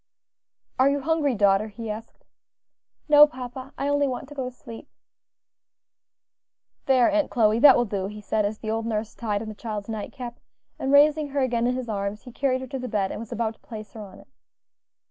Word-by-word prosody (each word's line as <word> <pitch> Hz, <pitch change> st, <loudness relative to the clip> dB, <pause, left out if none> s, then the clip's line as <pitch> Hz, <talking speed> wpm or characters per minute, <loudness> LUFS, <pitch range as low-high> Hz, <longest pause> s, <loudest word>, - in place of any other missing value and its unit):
"Are 265 Hz, +2 st, +5 dB
you 285 Hz, 0 st, 0 dB
hungry, 300 Hz, -3 st, +1 dB
daughter?" 200 Hz, 0 st, +3 dB
he 220 Hz, +1 st, -6 dB
asked. 220 Hz, +2 st, -10 dB, 0.8 s
"No, 295 Hz, 0 st, +8 dB
papa; 255 Hz, 0 st, -8 dB
I 275 Hz, -, -2 dB
only 285 Hz, 0 st, +2 dB
want 260 Hz, 0 st, -4 dB
to -, -, -9 dB
go 260 Hz, -3 st, -3 dB
to -, -, -15 dB
sleep." 230 Hz, -2 st, -11 dB, 2.0 s
"There, 255 Hz, -3 st, +5 dB
Aunt 305 Hz, -1 st, +1 dB
Chloe, 220 Hz, -1 st, +3 dB
that 275 Hz, 0 st, +8 dB
will 240 Hz, -, +2 dB
do," 195 Hz, -3 st, -3 dB
he 210 Hz, +1 st, -8 dB
said, 210 Hz, +1 st, -1 dB
as 205 Hz, +1 st, -2 dB
the 215 Hz, 0 st, -4 dB
old 225 Hz, 0 st, -2 dB
nurse 220 Hz, -1 st, -2 dB
tied 210 Hz, -2 st, -2 dB
on -, -, -8 dB
the 215 Hz, -, -6 dB
child's 210 Hz, -1 st, -6 dB
night 215 Hz, -2 st, -5 dB
cap; 245 Hz, -2 st, -8 dB, 0.4 s
and 270 Hz, -, -1 dB
raising 295 Hz, +1 st, +5 dB
her 280 Hz, 0 st, -1 dB
again 240 Hz, -2 st, +1 dB
in 250 Hz, -, 0 dB
his 255 Hz, -1 st, -4 dB
arms, 200 Hz, -1 st, -3 dB
he 250 Hz, -, -11 dB
carried 260 Hz, +1 st, 0 dB
her 260 Hz, -, -6 dB
to 270 Hz, -1 st, -4 dB
the 250 Hz, -, -5 dB
bed 200 Hz, -4 st, -1 dB
and -, -, -5 dB
was 225 Hz, -1 st, -9 dB
about 225 Hz, 0 st, -1 dB
to -, -, -29 dB
place 215 Hz, -3 st, -10 dB
her 220 Hz, -, -8 dB
on 195 Hz, -2 st, -11 dB
it. -, -, -17 dB
235 Hz, 215 wpm, -25 LUFS, 215-270 Hz, 2.0 s, No